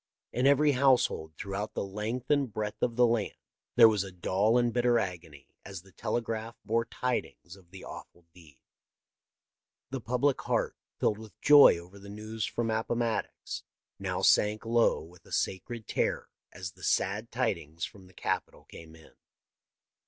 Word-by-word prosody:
In 125 +2 +2
every 145 +1 +5
household 125 - +2
throughout 100 +2 -4
the - - -1
length 110 +7 -4
and 140 -5 +2
breadth 105 0 -4
of 120 - 0
the 125 0 +5
land 115 -3 0 0.4
there 115 -2 +9
was 105 -3 +2
a 95 - -8
dull 95 +5 +1
and 120 -1 +2
bitter 120 -1 +3
agony 85 - -5
as 95 -3 -8
the 95 - -19
telegraph 115 +2 -3
bore 115 +1 +1
tidings 120 -8 -4
of 95 -3 -20
the 95 0 -11
awful 85 -1 -11
deed. 80 -6 -18 1.3
The 135 -2 -4
public 125 +4 +1
heart, - - -1 0.2
filled 105 - +1
with 110 -5 -13
joy 145 -10 +8
over 90 +4 -12
the 100 +1 -12
news 110 +1 -4
from 115 -1 -2
Appomattox, 115 +1 -2 0.4
now - - -3
sank 105 +2 +4
low 115 0 +2
with 85 +2 -16
a - - -16
sacred 110 +4 -2
terror - - -1 0.2
as 90 -2 -7
the - - -20
sad 105 +4 0
tidings 85 - -2
from 95 -2 -13
the 95 - -19
Capitol - - -3
came 80 -1 -13
in. 80 -1 -18
110 Hz, 160 wpm, -30 LUFS, 95-120 Hz, 1.3 s, there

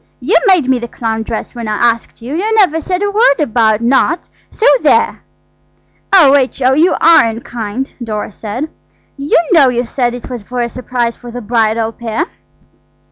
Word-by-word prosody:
"You - - 0
made 360 -9 +3
me 260 -1 +2
the 235 - -5
clown 225 -1 -3
dress 220 0 -5
when 235 -3 -6
I 215 - -1
asked 230 0 -1
you. 255 +4 -6
You 430 +6 -1
never 360 -7 +3
said 365 +4 -2
a 405 - 0
word 415 - +3
about 225 -6 +1
not. 265 +7 +1 0.2
So 450 - -3 0.2
there!" - - +2 0.9
"Oh, 335 -8 +6
H.O., 265 -1 +2
you 325 +6 +3
are 330 -4 +5
unkind!" 230 +1 -5
Dora 215 -2 -4
said. 235 +10 -6 0.4
"You 280 +1 0
know 300 -7 +5
you 245 0 -1
said 245 0 -2
it 245 - -9
was 245 -3 -6
for 245 +4 -5
a 235 - -2
surprise 245 -1 -3
for 245 - -12
the 245 +1 -7
bridal 225 0 0
pair." 235 +7 -3
245 Hz, 180 wpm, -14 LUFS, 230-295 Hz, 0.9 s, Oh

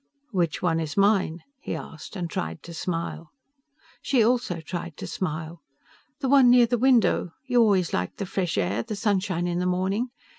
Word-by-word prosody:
"Which 175 -6 -1
one 165 -2 +2
is 155 0 -4
mine," 195 -5 +2 0.2
he - - -4
asked, 160 +5 -9
and 175 -3 -3
tried 80 - -4
to 170 - -9
smile. 165 -1 -4 0.7
She 250 -5 +3
also 235 -7 +1
tried 165 0 -6
to - - -6
smile. 160 -2 -4 0.6
"The 270 - 0
one 265 -2 +6
near 245 0 +7
the 240 0 0
window. 240 -8 +3
You 245 -2 +3
always 195 -6 +3
liked 90 0 -2
the 195 - -3
fresh 185 -2 -2
air, 100 +5 0
the 210 - -5
sunshine 195 -4 0
in 175 0 -1
the 180 - 0
morning. 190 +6 0
180 Hz, 180 wpm, -25 LUFS, 165-220 Hz, 0.7 s, near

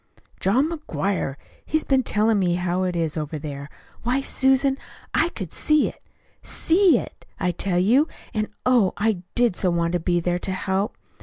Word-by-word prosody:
"John 245 +10 +3
McGuire. 200 - -2 0.3
He's 315 0 0
been 265 -1 +2
telling 215 -2 +2
me 175 -2 +2
how 180 0 -1
it 180 -1 -1
is 165 -2 -1
over 155 0 -3
there. 140 -1 -7 0.3
Why, 250 +3 +1
Susan, 270 0 +2 0.3
I 330 - +3
could 190 - -7
see 305 -1 +3
it - - -15 0.4
SEE 345 -3 +3
it, - - -8
I 180 -2 +1
tell 175 +1 -2
you, 240 - +4 0.3
and, 215 -1 -1 0.2
oh, 245 -7 +4
I 210 -3 +1
did 240 -6 +3
so 185 - +1
want 170 0 0
to 175 - +1
be 175 +1 +1
there 175 +1 -1
to 190 - -3
help. 190 +2 -1
195 Hz, 175 wpm, -23 LUFS, 175-260 Hz, 0.4 s, you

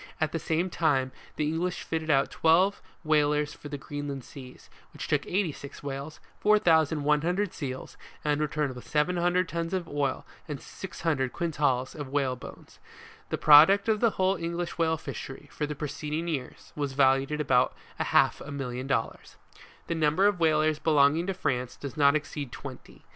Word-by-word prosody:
At 155 -2 0
the 165 - -2
same 165 +4 -1
time, 135 -7 +1 0.2
the 150 - -1
English 170 +3 -2
fitted 160 -1 -3
out 135 -2 +3
twelve 180 +5 +3 0.2
whalers 150 -1 +2
for 145 - -10
the 145 - -4
Greenland 140 -1 -6
seas, 130 -1 -12 0.3
which - - -6
took - - 0
86 160 -8 -3
whales, 140 +2 -6 0.2
4,100 165 -1 +2
seals, 130 -3 -6 0.3
and 150 0 +1
returned 150 -2 -1
with 125 - -11
700 175 +3 +1
tons 170 +2 -2
of 180 -3 -3
oil 145 -3 -2 0.2
and 145 -3 -5
600 155 -8 -3
quintals 145 -6 0
of 145 -3 -6
whalebone. 130 -2 -3 0.6
The - - -1
product 160 +8 +7
of 220 -1 +2
the 230 - +4
whole 190 +1 +2
English 170 +1 -3
whale 160 -1 +2
fishery, 135 -2 -8
for 150 - -3
the 150 - -4
preceeding 150 +3 -4
year, 140 -7 -3 0.2
was 145 -2 -2
valued 135 0 +3
at 150 - -2
about 130 -4 +2 0.2
a - - 0
half - - +3
a - - -8
million 130 -2 -4
of - - -9
dollars. 115 -4 -2 0.5
The - - -2
number 160 +4 +2
of 205 -3 +3
whalers 155 -1 +2
belonging 155 +2 +3
to 195 - -1
France 125 -8 -2
does 140 -1 -7
not 140 -1 +4
exceed 145 -3 -3
twenty. - - -10
150 Hz, 170 wpm, -28 LUFS, 140-170 Hz, 0.6 s, product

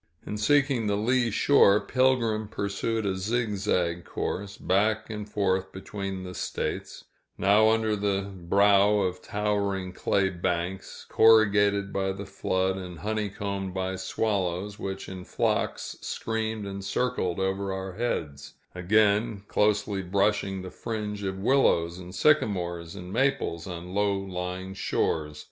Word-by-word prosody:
In 105 - -4
seeking 135 0 +2
the 100 0 +1
lee 120 +3 +2
shore, 105 -3 +5
Pilgrim 120 -5 +1
pursued 100 +2 -2
a 95 -1 0
zigzag 95 -5 0
course, 100 +2 -4
back 110 +4 +1
and 105 -1 -6
forth 95 -2 0
between 95 -1 -5
the 90 0 -7
States, - - -4 0.3
now 105 +2 +5
under 110 -1 +2
the 100 -1 0
brow 100 +3 +4
of 90 -1 -2
towering 100 -3 -1
clay 95 +1 +1
banks, 90 +1 -3
corrugated 100 -2 +4
by 95 0 0
the 100 +1 -7
flood, 95 0 -1
and 90 -2 -7
honeycombed 100 -3 -3
by 95 0 -2
swallows, 95 0 -2
which 95 0 -5
in 95 -1 -7
flocks - - -1
screamed 110 -1 -3
and 100 0 -6
circled 95 -4 -1
over 95 +1 -1
our 95 0 -4
heads; 75 - -3 0.2
again, 105 +3 +2
closely 105 -1 +1
brushing 95 0 0
the 95 - -7
fringe 105 -3 -4
of 95 -1 -3
willows 95 -7 +2
and 90 +1 -9
sycamores 90 - +1
and 90 -1 -8
maples 130 -9 0
on 90 0 -7
low 100 0 +2
lying 95 0 -5
shores. 75 -5 -1
100 Hz, 130 wpm, -27 LUFS, 95-105 Hz, 0.3 s, shore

